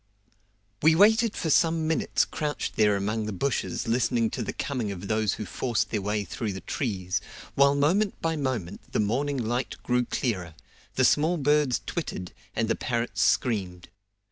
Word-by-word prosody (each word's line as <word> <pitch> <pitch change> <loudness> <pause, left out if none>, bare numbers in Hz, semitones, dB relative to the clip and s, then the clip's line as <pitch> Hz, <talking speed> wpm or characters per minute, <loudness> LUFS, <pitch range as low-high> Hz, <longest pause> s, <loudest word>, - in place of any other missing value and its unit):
We 160 +1 +5
waited 220 +4 +5
for 160 - -1
some 160 +1 +3
minutes 160 - +1
crouched 150 -2 -3
there 105 -2 +4
among 105 +2 -1
the - - -2
bushes 120 +6 -2
listening 115 -1 +1
to 125 - -3
the 110 - -2
coming 125 -7 -3
of 100 0 -6
those 110 -1 +1
who 105 - -5
forced 110 -3 -1
their 105 - -1
way 105 +1 -1
through 110 -1 -4
the 95 - -7
trees, 95 -8 -2 0.3
while 140 +1 +4
moment 185 +9 +2
by 165 0 -1
moment 125 - -4
the - - +1
morning 135 +7 0
light 120 +1 -2
grew 125 0 +1
clearer, 90 - -2 0.4
the 130 - +4
small 155 +7 +3
birds 145 -3 +2
twittered, 90 - -4 0.2
and 115 - 0
the 115 - +2
parrots 115 -5 -2
screamed. 95 -4 0
120 Hz, 170 wpm, -27 LUFS, 105-145 Hz, 0.4 s, We